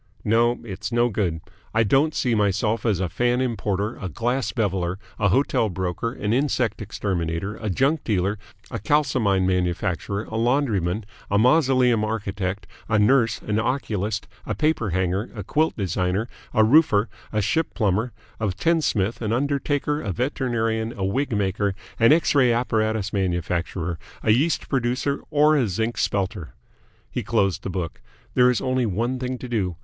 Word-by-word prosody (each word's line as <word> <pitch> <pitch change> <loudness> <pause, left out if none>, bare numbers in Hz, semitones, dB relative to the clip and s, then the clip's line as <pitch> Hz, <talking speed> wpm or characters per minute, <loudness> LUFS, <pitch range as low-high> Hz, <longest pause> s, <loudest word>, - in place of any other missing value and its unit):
No, 115 +3 +2
it's 105 0 -6
no 120 +1 +3
good. 90 -7 -1 0.3
I 115 - +5
don't 135 +9 +2
see 125 - +1
myself 105 +2 +1
as 100 -5 +2
a 95 - 0
Fan 120 +8 +1
Importer, 110 -4 -1
a 95 - -5
Glass 120 - -1
Beveller, 95 -5 -1 0.2
a 100 - +3
Hotel 115 -1 +2
Broker, 95 +5 -2
an 105 -3 -2
Insect 125 -5 0
Exterminator, 95 -2 -2
a 110 - -4
Junk 135 - +1
Dealer, 100 -1 0 0.3
a 115 - -3
Kalsomine 115 -7 +2
Manufacturer, 90 +2 -1
a 110 - -5
Laundryman, 110 -6 +1 0.2
a 100 - +2
Mausoleum 125 -2 +4
Architect, 100 -3 -3 0.2
a 105 - +3
Nurse, 115 +2 +3
an 105 0 0
Oculist, 110 -4 -2 0.2
a - - -1
Paper 155 -9 +1
Hanger, 95 +4 -1
a 100 - -5
Quilt 155 - 0
Designer, 95 +2 -1 0.2
a 110 - +4
Roofer, 115 -4 +5 0.2
a 110 - 0
Ship 130 +11 0
Plumber, 110 +2 +1 0.3
a 110 - 0
Tinsmith, 115 - 0
an 110 -2 -1
Undertaker, 145 +3 0
a 100 - -3
Veterinarian, 115 - -1
a 95 - -1
Wig 135 +8 -1
Maker, 100 0 0 0.2
an 115 - +6
X 160 +2 +4
ray 130 -4 +4
apparatus 110 -3 0
manufacturer, 90 -2 -1 0.2
a 110 - +4
Yeast 145 +9 +2
producer, 130 +2 0
or 150 0 +4
a 130 -6 +2
Zinc 110 +5 -1
Spelter." 95 - -1 0.6
He - - -2
closed 100 -5 +1
the - - -5
book. 90 -3 -4 0.3
"There 125 -1 +5
is 125 - +1
only 130 -2 +1
one 120 +6 -1
thing 130 0 -3
to 125 - -7
do. 100 -7 -1
110 Hz, 160 wpm, -24 LUFS, 95-125 Hz, 0.6 s, an